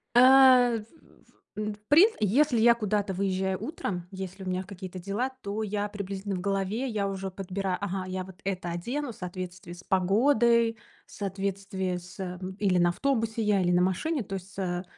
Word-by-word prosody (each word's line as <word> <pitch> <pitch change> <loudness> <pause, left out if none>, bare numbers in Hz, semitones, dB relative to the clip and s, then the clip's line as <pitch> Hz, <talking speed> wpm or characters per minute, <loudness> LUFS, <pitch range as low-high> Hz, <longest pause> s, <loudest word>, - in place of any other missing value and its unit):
А, 255 -1 +7
в - - -9 0.7
в - - -6
м, 210 0 -2
в 205 - -15
прин 340 +9 +8
если 245 +5 +3
я 235 +1 +7
куда-то 210 -3 -1
выезжаю 190 0 -1
утром, 195 - -4
если 190 0 -7
у - - -7
меня 185 0 -1
какие-то 185 -1 -8
дела, 200 +8 -2
то 205 +1 -3
я 205 0 -2
приблизительно 200 -1 -4
в - - -3
голове, 200 +6 -1
я 210 -5 -1
уже 195 0 -4
подбира 190 0 -3
Ага, 195 -1 -3
я 185 0 -3
вот 190 0 -14
это 185 -3 -2
одену 245 +11 -3
в - - -13
соответствии 180 -1 -7
с 175 +1 -12
погодой, 225 +4 +3 0.3
в - - -20
соответствии 195 -1 -3
с, 180 +2 -12
эм, 185 0 -5
или 190 -3 +2
на 175 0 +4
автобусе 225 +2 0
я, 210 -2 +2
или 175 - +2
на 175 0 +4
машине. 235 - 0
То 195 0 -5
есть, 190 +1 -9
а, 180 -1 -2
195 Hz, 190 wpm, -28 LUFS, 185-220 Hz, 0.7 s, прин